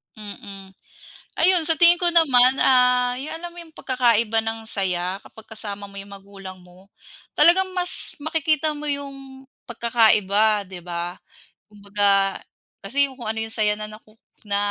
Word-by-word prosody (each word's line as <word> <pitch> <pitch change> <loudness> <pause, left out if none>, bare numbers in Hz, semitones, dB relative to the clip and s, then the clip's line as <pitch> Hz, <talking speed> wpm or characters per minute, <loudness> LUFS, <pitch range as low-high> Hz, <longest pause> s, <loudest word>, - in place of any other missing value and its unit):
Mm. 200 -2 -11 0.7
Ayun 350 0 +3
sa 325 - +2
tingin 345 0 +7
ko 350 0 +1
naman 265 -6 +4
ah, 250 -1 +3
yung 280 +4 -6
alam 345 +2 -7
mo - - -15
yung 320 - -20
pagkakaiba 230 -5 +1
ng 225 0 -5
saya? 185 -2 -2
Kapag 220 - -16
kasama 205 -2 -7
mo 200 - -16
yung 200 0 -9
magulang 195 -1 -11
mo? 180 +2 -20 0.4
Talagang 370 +5 +4
mas 360 -1 -2
makikita 310 0 0
mo 300 +1 -7
yung 275 -2 -6 0.2
pagkakaiba, 215 -3 +2
'di 180 -2 -10
ba? 175 0 -5 0.5
Kumbaga 200 -1 0 0.4
kasi 275 +7 0
kung 245 -4 -10
ano 220 0 -2
yung 225 - -6
saya 210 -2 +1
na 215 0 -7
naku 215 0 -16 0.3
na 200 -1 -3
225 Hz, 150 wpm, -22 LUFS, 200-280 Hz, 0.7 s, tingin